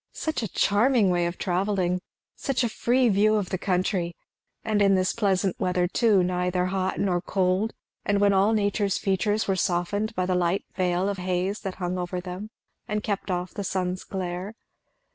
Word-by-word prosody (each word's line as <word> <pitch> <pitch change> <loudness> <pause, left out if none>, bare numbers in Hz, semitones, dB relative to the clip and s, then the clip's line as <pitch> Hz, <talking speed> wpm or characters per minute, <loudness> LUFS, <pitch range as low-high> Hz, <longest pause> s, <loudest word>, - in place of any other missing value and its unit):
Such 315 -4 -2
a 220 - -2
charming 205 +2 +3
way 175 -1 +1
of 175 - -5
travelling! 185 -1 0 0.3
Such 270 -2 -1
a 235 - +1
free 245 +3 +2
view 215 +1 +4
of 205 -4 -1
the 185 - -1
country! 180 -2 0 0.5
and 215 -2 +1
in 195 -1 +5
this 185 0 +1
pleasant 195 -4 0
weather 180 -1 +1
too, 205 -1 +3
neither 180 0 0
hot 190 0 -1
nor 180 -3 +1
cold, 190 +3 0 0.3
and 205 0 +1
when 200 0 +4
all 195 +3 +4
nature's 205 -2 +1
features 205 +2 0
were 195 - +2
softened 195 +4 -1
by 185 - 0
the 185 - 0
light 180 +1 +1
veil 180 0 +1
of 200 -2 -2
haze 185 +3 -1
that 195 -2 -5
hung 180 0 -3
over 180 0 -3
them 180 +3 -6 0.4
and 210 0 -2
kept 205 -2 -2
off 180 -1 -2
the 200 - -4
sun's 185 -1 -2
glare. 185 +2 -4
190 Hz, 180 wpm, -26 LUFS, 180-205 Hz, 0.5 s, in